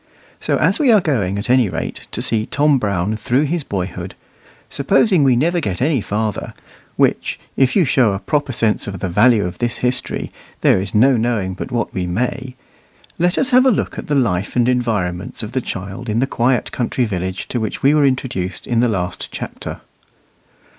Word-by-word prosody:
So -, -, 0 dB
as -, -, +2 dB
we 280 Hz, -5 st, +4 dB
are 215 Hz, -, +6 dB
going 110 Hz, -, -1 dB
at 100 Hz, -, -4 dB
any 125 Hz, -4 st, +3 dB
rate 80 Hz, -1 st, -5 dB
to -, -, 0 dB
see 110 Hz, -1 st, +1 dB
Tom 145 Hz, -1 st, +2 dB
Brown 100 Hz, -1 st, -1 dB
through 125 Hz, +6 st, +1 dB
his 160 Hz, +1 st, -1 dB
boyhood, 95 Hz, -6 st, -5 dB, 0.5 s
supposing 185 Hz, -9 st, +2 dB
we 130 Hz, -3 st, +4 dB
never 170 Hz, +8 st, +1 dB
get 100 Hz, -, -3 dB
any 135 Hz, -2 st, +1 dB
farther 105 Hz, +1 st, -3 dB, 0.4 s
(which, -, -, +1 dB, 0.2 s
if 130 Hz, -1 st, +2 dB
you 185 Hz, -, +4 dB
show 125 Hz, -4 st, +3 dB
a -, -, -1 dB
proper 145 Hz, +7 st, -1 dB
sense 115 Hz, -3 st, 0 dB
of 95 Hz, -2 st, -5 dB
the 95 Hz, -, -3 dB
value 105 Hz, +3 st, +4 dB
of 90 Hz, -, -6 dB
this 120 Hz, -1 st, -1 dB
history, 125 Hz, 0 st, -1 dB, 0.3 s
there -, -, +4 dB
is 95 Hz, +2 st, -5 dB
no 130 Hz, +4 st, +5 dB
knowing 110 Hz, -5 st, -1 dB
but 100 Hz, -, -7 dB
what 120 Hz, -1 st, -2 dB
we 90 Hz, -2 st, -2 dB
may), 125 Hz, +6 st, -3 dB, 0.6 s
let 175 Hz, +2 st, +2 dB
us 270 Hz, -, +2 dB
have 255 Hz, +1 st, +6 dB
a -, -, +7 dB
look 225 Hz, -, -1 dB
at -, -, -8 dB
the 150 Hz, -, 0 dB
life 105 Hz, -8 st, 0 dB
and 120 Hz, -1 st, +3 dB
environments 105 Hz, -8 st, -1 dB
of 110 Hz, -, -6 dB
the 130 Hz, +1 st, -1 dB
child 100 Hz, +4 st, -6 dB
in 105 Hz, -, 0 dB
the 125 Hz, -, +2 dB
quiet 125 Hz, -1 st, 0 dB
country 125 Hz, 0 st, -1 dB
village 95 Hz, -3 st, -4 dB
to 125 Hz, -, -2 dB
which 110 Hz, -, -4 dB
we 140 Hz, +2 st, +5 dB
were 150 Hz, -1 st, +4 dB
introduced 130 Hz, -9 st, -1 dB
in 120 Hz, -2 st, 0 dB
the 120 Hz, 0 st, +3 dB
last 90 Hz, -4 st, -3 dB
chapter. -, -, -7 dB
120 Hz, 200 wpm, -18 LUFS, 100-135 Hz, 0.6 s, a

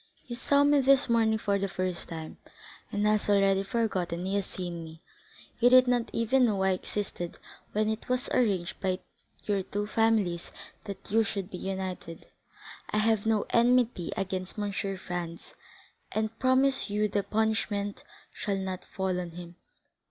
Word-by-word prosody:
He 240 Hz, -, -7 dB
saw 280 Hz, +3 st, +3 dB
me 290 Hz, -1 st, +5 dB
this 270 Hz, +1 st, +4 dB
morning 225 Hz, -1 st, +3 dB
for 200 Hz, -2 st, 0 dB
the 195 Hz, -, 0 dB
first 185 Hz, -2 st, -3 dB
time, 160 Hz, -2 st, -7 dB, 0.5 s
and 205 Hz, 0 st, 0 dB
has 210 Hz, -1 st, +2 dB
already 195 Hz, -1 st, +4 dB
forgotten 190 Hz, -5 st, -1 dB
he 190 Hz, -, -2 dB
has 200 Hz, -1 st, 0 dB
seen 175 Hz, -2 st, -5 dB
me. 160 Hz, 0 st, -11 dB, 0.6 s
He 245 Hz, -, +6 dB
did 255 Hz, 0 st, +7 dB
not 245 Hz, -1 st, +1 dB
even 250 Hz, +3 st, +3 dB
know 200 Hz, -4 st, +1 dB
I 190 Hz, -, +3 dB
existed 185 Hz, -2 st, -4 dB, 0.4 s
when 215 Hz, +1 st, +1 dB
it 220 Hz, +3 st, -3 dB
was 255 Hz, +1 st, 0 dB
arranged 195 Hz, -8 st, +1 dB
by 185 Hz, -1 st, 0 dB, 0.5 s
your 200 Hz, -2 st, +1 dB
two 205 Hz, +2 st, -3 dB
families 210 Hz, -5 st, +1 dB, 0.3 s
that 200 Hz, -1 st, -8 dB
you 225 Hz, +1 st, +4 dB
should 200 Hz, -1 st, -4 dB
be 180 Hz, -, -6 dB
united. 190 Hz, -3 st, -5 dB, 0.6 s
I -, -, -1 dB
have 220 Hz, 0 st, +2 dB
no 220 Hz, -2 st, +2 dB
enmity 240 Hz, -6 st, +3 dB
against 190 Hz, -1 st, -3 dB
M. 205 Hz, -1 st, -1 dB
Franz, 180 Hz, -4 st, -4 dB, 0.6 s
and 220 Hz, +1 st, -2 dB
promise 265 Hz, 0 st, +3 dB
you 210 Hz, +1 st, +1 dB
the 205 Hz, 0 st, 0 dB
punishment 210 Hz, -1 st, -1 dB, 0.3 s
shall 200 Hz, -2 st, -2 dB
not 190 Hz, -1 st, -4 dB
fall 190 Hz, -1 st, -2 dB
on 175 Hz, -1 st, -4 dB
him." 175 Hz, 0 st, -9 dB
205 Hz, 160 wpm, -29 LUFS, 185-225 Hz, 0.6 s, did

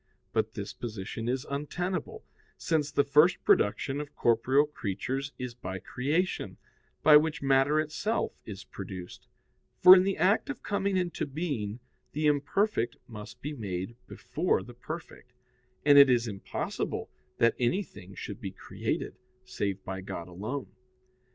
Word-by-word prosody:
But -, -, 0 dB
this -, -, -5 dB
position 115 Hz, 0 st, -5 dB
is 130 Hz, +3 st, -1 dB
untenable, 165 Hz, +5 st, -3 dB, 0.3 s
since 155 Hz, -3 st, 0 dB
the 140 Hz, -, +3 dB
first 150 Hz, +5 st, +4 dB
production 135 Hz, +7 st, +2 dB
of 145 Hz, -1 st, -9 dB
corporeal 130 Hz, +5 st, +3 dB
creatures 135 Hz, +1 st, -3 dB
is 125 Hz, -1 st, -5 dB
by 95 Hz, -6 st, -6 dB
creation, 150 Hz, -, -1 dB, 0.5 s
by 150 Hz, -1 st, +9 dB
which 150 Hz, -1 st, 0 dB
matter 135 Hz, +2 st, +4 dB
itself 155 Hz, +9 st, -1 dB
is 105 Hz, -2 st, -8 dB
produced: 95 Hz, -2 st, -9 dB, 0.5 s
for 185 Hz, +1 st, +10 dB
in 185 Hz, -, +6 dB
the 195 Hz, +1 st, 0 dB
act 200 Hz, +9 st, +3 dB
of 285 Hz, -, -5 dB
coming 200 Hz, -1 st, 0 dB
into 175 Hz, -4 st, -1 dB
being 130 Hz, -8 st, -3 dB, 0.3 s
the 155 Hz, +1 st, -1 dB
imperfect 145 Hz, -, +1 dB
must 105 Hz, -3 st, -10 dB
be 150 Hz, +2 st, -3 dB
made 100 Hz, -3 st, -4 dB
before 170 Hz, +5 st, -1 dB
the 120 Hz, -, -11 dB
perfect: 125 Hz, -1 st, -9 dB, 0.5 s
and 145 Hz, -1 st, +8 dB
it 140 Hz, -1 st, +9 dB
is 120 Hz, -2 st, +3 dB
impossible 100 Hz, -3 st, -4 dB, 0.3 s
that 115 Hz, 0 st, +4 dB
anything 120 Hz, -, -2 dB
should 105 Hz, +4 st, -7 dB
be 100 Hz, -, -3 dB
created, 95 Hz, -, -4 dB, 0.3 s
save 100 Hz, -6 st, -3 dB
by 95 Hz, 0 st, -5 dB
God 95 Hz, -3 st, -6 dB
alone. 110 Hz, +10 st, -5 dB
135 Hz, 140 wpm, -29 LUFS, 105-155 Hz, 0.5 s, for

